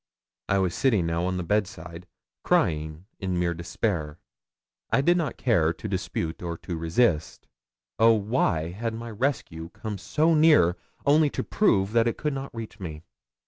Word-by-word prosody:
I 100 - +3
was 95 -3 +1
sitting 110 -10 +2
now 85 +1 -1
on 95 0 -1
the 90 - -2
bedside, 90 -2 -3 0.4
crying 80 +1 0
in 95 -2 -2
mere 85 -1 +1
despair. 85 -2 -3 0.7
I - - +3
did 175 +5 +4
not 165 -4 -2
care 85 -10 +2
to 110 - -7
dispute 90 -4 -3
or 85 -1 -4
to 85 - -6
resist. 80 0 0 0.5
Oh! 115 +1 +7
why 100 -7 0
had 115 +4 -4
rescue 115 - -3
come 105 +1 -6
so 155 - +2
near, 150 - +5 0.3
only 150 +1 +5
to - - -3
prove 100 - +2
that 115 0 +3
it 115 - -1
could 150 -1 -2
not 135 0 -5
reach 115 -2 -8
me? 80 -4 -7
95 Hz, 160 wpm, -26 LUFS, 85-120 Hz, 0.7 s, Oh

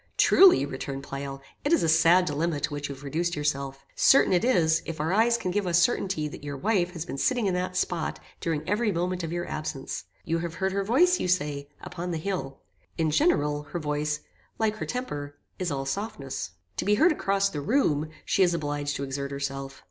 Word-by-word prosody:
"Truly," 370 - +7
returned 135 0 -5
Pleyel, 135 0 -6 0.2
"it 290 - 0
is 335 - +4
a - - +2
sad 165 +3 +5
dilemma 155 0 -1
to - - -2
which 145 0 -4
you 140 - -5
have 135 - -14
reduced 170 +5 -1
yourself. 140 -2 -2
Certain 270 -7 +5
it 180 - +3
is, 165 -10 +3
if 165 -1 -5
our 160 +4 0
eyes 230 +3 +4
can 185 - -3
give 200 0 0
us 170 -1 +3
certainty 175 -5 +1
that 150 - -9
your 140 -1 -5
wife 180 0 +1
has 165 -2 -5
been 140 - -5
sitting 245 -4 +1
in 190 - +1
that 180 0 -2
spot 175 -2 -1 0.2
during 160 -3 -2
every 210 +1 +1
moment 180 0 -1
of 165 - -3
your 175 0 -3
absence. 155 -3 -5 0.2
You 165 +1 0
have 170 -1 -4
heard 190 +1 0
her 200 +1 0
voice, 345 - +4
you - - -1
say, 145 -5 -1
upon 180 0 -5
the 170 - -1
hill. 160 -6 -4 0.4
In 160 -2 +1
general, 150 - +2
her 150 +4 -6
voice, 150 0 -1 0.4
like 220 -1 0
her - - -4
temper, 145 - -4 0.2
is 180 -2 -1
all 135 -2 -2
softness. 140 - -4 0.2
To - - -1
be 210 +1 +4
heard 325 +11 +5
across 200 -8 +1
the 150 -6 -4
room, 155 - +1 0.2
she - - +1
is 175 -2 +4
obliged 145 -2 -2
to 140 - -3
exert 140 0 -3
herself. 135 -1 -5
165 Hz, 215 wpm, -27 LUFS, 145-195 Hz, 0.4 s, Truly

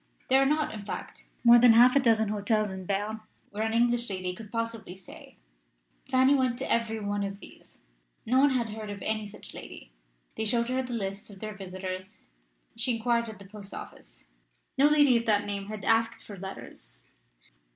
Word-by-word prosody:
There 265 +1 +5
are 270 - +4
not, 300 +1 0
in 210 -2 -7
fact, - - -7 0.2
more 240 0 +8
than 240 -1 +7
half 245 +3 +7
a - - +6
dozen 225 -4 +3
hotels 210 0 0
in 190 -1 -7
Berne 210 +2 -2 0.3
where 205 +1 -4
an 220 0 0
English 240 0 +2
lady 185 -2 -3
could 210 +2 -11
possibly 230 -5 -4
stay. 190 - -14 0.7
Fanny 260 +1 +4
went 255 -3 +1
to 265 - -4
every 225 -1 +1
one 205 -1 -2
of 200 0 -4
these. - - -16 0.4
No 255 +3 +3
one 285 +1 +6
had 245 -4 0
heard 215 0 -7
of 205 -1 -6
any 215 -1 -1
such 205 - -12
lady: - - -10 0.4
they 220 - -2
showed 235 +2 +1
her 260 +1 0
the 250 -1 -6
lists 195 -2 -4
of 200 -2 -13
their 215 +1 -5
visitors. 185 0 -7 0.5
She 245 - 0
inquired 235 0 0
at 215 - -9
the 200 - -13
post 200 0 -9
office. - - -11 0.5
No 275 +2 +5
lady 290 -4 +5
of 230 - -3
that 205 -1 +3
name 200 -1 -3
had 210 -1 -7
asked 225 0 +2
for 205 - -9
letters. - - -9
220 Hz, 195 wpm, -28 LUFS, 200-240 Hz, 0.7 s, more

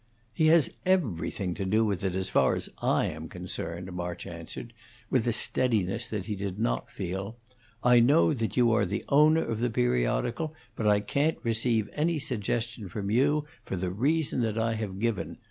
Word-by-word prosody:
"He 160 - +2
has 160 -1 +5
everything 100 - 0
to 100 - -4
do 110 +4 +2
with 100 -4 -1
it 95 -2 -1
as 95 0 0
far - - +3
as - - -4
I - - +2
am - - -5
concerned," 85 +3 -5
March 90 -1 -5
answered, 85 +7 -8 0.4
with 125 -3 +2
a - - +3
steadiness 110 -5 +1
that 105 -4 -4
he 105 - -3
did 100 -1 -4
not - - -1
feel. 95 +4 -5 0.5
"I 125 0 +6
know 145 +7 +5
that 115 -3 -3
you 120 -2 +5
are 105 -4 +2
the 100 +4 -3
owner 155 +3 +5
of 110 - -3
the 120 +1 +1
periodical, 60 - 0 0.2
but 110 - -1
I 105 -1 +4
can't 145 +9 0
receive 115 -1 +1
any 160 +2 +1
suggestion 115 -4 -2
from 100 +2 -4
you, 145 +6 +2 0.2
for - - -4
the 90 0 -2
reason 140 - +1
that 110 -2 -1
I 115 0 +1
have 105 -4 -4
given. 115 -1 -2
110 Hz, 185 wpm, -28 LUFS, 95-125 Hz, 0.5 s, I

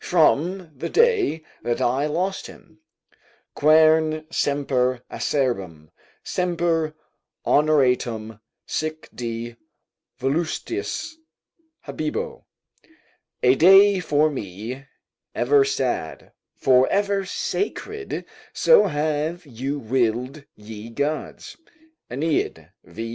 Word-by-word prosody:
From 175 +1 +2
the 130 - -5
day 440 - +2 0.2
that 120 0 -1
I 135 +5 +1
lost 180 +6 -2
him: 160 -2 -16 0.7
"Quern 155 +1 +4
semper 130 -5 0
acerbum, 95 - -2 0.3
Semper 170 -3 -1 0.5
honoratum 125 -7 +2 0.3
(sic, 155 0 -4
di, 115 0 -5 0.6
voluistis) 175 - -2 0.7
habebo," 155 -1 -4 1.0
["A 125 0 +6
day 195 +6 +7
for 155 -2 +2
me 115 +3 -6 0.5
ever 430 -1 +4
sad, 420 +1 -2 0.2
for 130 -1 +4
ever 200 0 +1
sacred, 415 - -4 0.3
so 485 -1 +5
have 155 +2 -2
you 135 +2 -4
willed 125 +3 -1
ye 105 +1 -10
gods." 145 +6 -4 0.5
AEneid, 150 +5 -2
v. 115 +1 -7
150 Hz, 85 wpm, -23 LUFS, 125-170 Hz, 1.0 s, day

